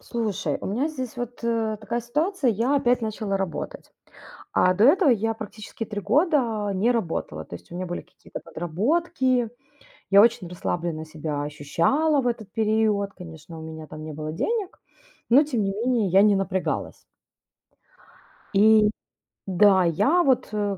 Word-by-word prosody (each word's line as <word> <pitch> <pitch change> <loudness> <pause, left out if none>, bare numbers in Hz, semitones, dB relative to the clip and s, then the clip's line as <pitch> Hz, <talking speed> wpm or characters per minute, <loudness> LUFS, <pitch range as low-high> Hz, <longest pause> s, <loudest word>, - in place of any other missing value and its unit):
Слушай, 210 -10 -2
у - - -5
меня 245 +10 0
здесь 260 -7 -6
вот, 245 0 -6
э, 225 -2 0
такая 235 +2 -3
ситуация. 295 - 0
Я 235 +7 +1
опять 245 -2 +2
начала 215 -2 -2
работать, 190 -5 -5 0.6
а 185 - +4
до 205 +5 +4
этого 310 +2 +5
я 225 -1 +2
практически 215 +1 -7
3 205 -1 -5
года 235 - +1
не 205 +6 +2
работала. 165 - -3
То - - -8
есть 85 - -14
у 175 - -7
меня 185 - -3
были 175 0 -4
какие-то - - -11
подработки, 245 - 0 0.6
я 200 +1 +8
очень 225 -5 +3
расслабленно 170 -2 -3
себя 155 -2 -4
ощущала 170 - +1
в 250 - -1
этот 220 -4 -3
период. 215 -2 +1
Конечно, 165 -2 -11
у - - -9
меня 160 -1 -8
там 155 +1 -9
не 155 0 -7
было 155 +1 -5
денег, 420 - -2 0.5
но, 265 +6 +7
тем 255 -8 -1
не 195 - 0
менее, 230 0 0
я 190 +3 +5
не 205 0 +5
напрягалась. 190 -1 -2 1.5
И 210 +1 +6 0.6
да, 190 0 +5
я 275 - +3
вот, 265 -4 +2
э, 205 -2 -1
215 Hz, 160 wpm, -24 LUFS, 180-245 Hz, 1.5 s, я